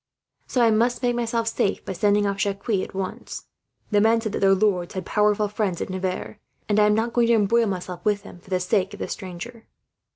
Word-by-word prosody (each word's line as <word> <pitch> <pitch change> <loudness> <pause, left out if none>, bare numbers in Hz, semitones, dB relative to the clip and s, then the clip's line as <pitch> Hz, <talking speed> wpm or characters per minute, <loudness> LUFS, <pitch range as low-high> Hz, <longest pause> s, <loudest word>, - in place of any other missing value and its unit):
So 250 - +2
I 230 - +5
must 235 +4 +1
make 245 -1 +2
myself 230 -1 -1
safe 205 -3 -1
by 190 - -4
sending 205 +2 +2
off 200 -1 -1
Jacques, 200 +3 -2
at 190 -2 -1
once. 190 -1 -5 0.5
The 205 -1 +4
men 225 +2 +4
said 220 -2 -3
that - - -2
their 195 0 +5
lords 190 -3 0
had 185 -2 -4
powerful 210 0 +2
friends 205 -4 -2
at - - -4
Nevers, 185 +2 -3 0.3
and 210 0 +2
I 210 - +5
am 210 - +3
not 230 +2 -1
going 240 -1 +3
to 235 - +5
embroil 225 +2 +3
myself 180 -2 -5
with 205 -1 +1
them, 180 - -12
for 185 - -20
the 185 -1 +1
sake 190 +1 0
of - - -11
a - - -2
stranger.' 215 +6 -8
205 Hz, 230 wpm, -24 LUFS, 190-225 Hz, 0.5 s, I